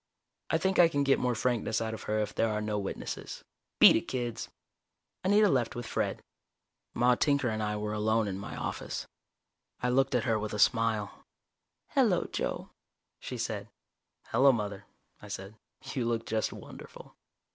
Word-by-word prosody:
I - - +3
think 190 -1 0
I 175 - +9
can 145 -3 0
get 140 -1 +3
more 125 -1 0
frankness 115 -2 0
out 110 0 -2
of 110 - -6
her 105 - +1
if 105 -1 -1
there 115 - +1
are 105 0 -1
no 105 -1 -1
witnesses. 100 - -5 0.3
Beat - - +9
it, - - -1
kids." 120 -3 -3 0.7
Anita 205 +3 +5
left 125 - +1
with 120 -1 -5
Fred. - - -2 0.7
Maude 125 0 +3
Tinker 140 -4 +2
and 110 0 -2
I 105 0 -1
were 105 0 -3
alone 110 +1 +1
in 95 -1 -4
my 100 - -7
office. - - -4 0.8
I 125 - +2
looked 135 +1 +2
at 120 - +2
her 110 -1 +1
with 105 0 -4
a - - -2
smile. 110 -2 +1 0.7
"Hello, - - +2
Joe," - - -3 0.5
she - - -6
said. - - -3 0.6
"Hello, 135 +1 +6
Mother," 105 -5 -3 0.4
I 105 - -10
said. 100 0 -6 0.4
"You 125 -3 -1
look 115 -1 -1
just 110 0 -1
wonderful." - - -11
115 Hz, 170 wpm, -30 LUFS, 105-125 Hz, 0.8 s, I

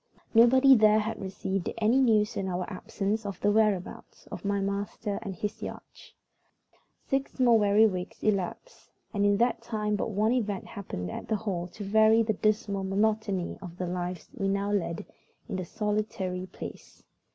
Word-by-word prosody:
Nobody 260 +4 +7
there 215 -3 +6
had 220 +1 -2
received 190 -1 -3
any 225 +4 +3
news 215 -4 +3
in 195 - -2
our 180 -1 -2
absence 205 +2 -3
of 200 -2 -5
the 205 - +2
whereabouts 210 -4 0
of - - -7
my 200 0 0
master 200 +1 -3
and 195 -4 -5
his 205 +4 -4
yacht. - - -9 0.9
Six 270 0 -2
more 240 -3 +5
weary 205 +1 +5
weeks 185 -3 -3
elapsed, 210 - -2 0.2
and 205 -1 +2
in 205 0 +3
that 240 +2 +1
time 210 -2 -2
but 205 - -2
one 215 +2 +1
event 210 -6 -1
happened 90 - -6
at - - -6
the 220 - +1
Hall 190 -5 -3
to 205 +4 -9
vary 220 +3 +5
the 220 0 0
dismal 210 -1 0
monotony 200 -1 0
of 175 -2 -9
the 185 - -2
lives 180 -1 -4
we 195 - -2
now 200 +1 0
led 170 -5 -1 0.4
in 190 - -3
the 185 - -3
solitary 205 -3 -2
place. 185 - -10
205 Hz, 170 wpm, -28 LUFS, 190-220 Hz, 0.9 s, Nobody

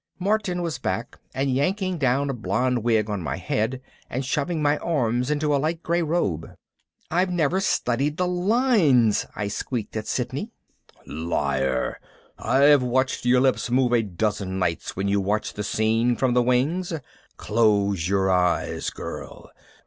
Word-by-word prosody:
Martin 190 -2 0
was 165 -2 -3
back 115 +6 -3
and 135 +1 -1
yanking 185 +7 0
down 135 +1 +1
a 135 - -1
blonde 125 +1 -1
wig 110 -2 +2
on 105 -3 -3
my 70 -5 -3
head 115 +5 -1 0.3
and 130 +2 -3
shoving 150 +5 -1
my 145 0 +2
arms 125 -5 0
into 150 0 +1
a - - +2
light 160 +2 -2
gray 170 +1 +1
robe. 150 - -1 0.6
"I've 180 +3 +2
never 175 0 +1
studied 145 -4 0
the 180 - +1
lines," 180 - +3
I 105 - -2
squeaked 110 +2 -4
at 110 -1 -4
Sidney. - - -3 0.6
"Liar! 70 -5 -1 0.4
I've 140 +1 +4
watched 130 +1 0
your 125 +1 +4
lips 130 -2 +1
move 125 0 +2
a 120 - +4
dozen 100 -1 -2
nights 85 -3 -2
when 95 +2 -2
you 100 0 +2
watched 105 +3 -1
the 105 - -3
scene 115 +3 +1
from 130 0 +1
the 125 - +4
wings. 135 +10 +1 0.5
Close 100 -5 +1
your 95 -1 +2
eyes, 90 -1 +1
girl! - - -8
125 Hz, 155 wpm, -24 LUFS, 105-150 Hz, 0.6 s, I've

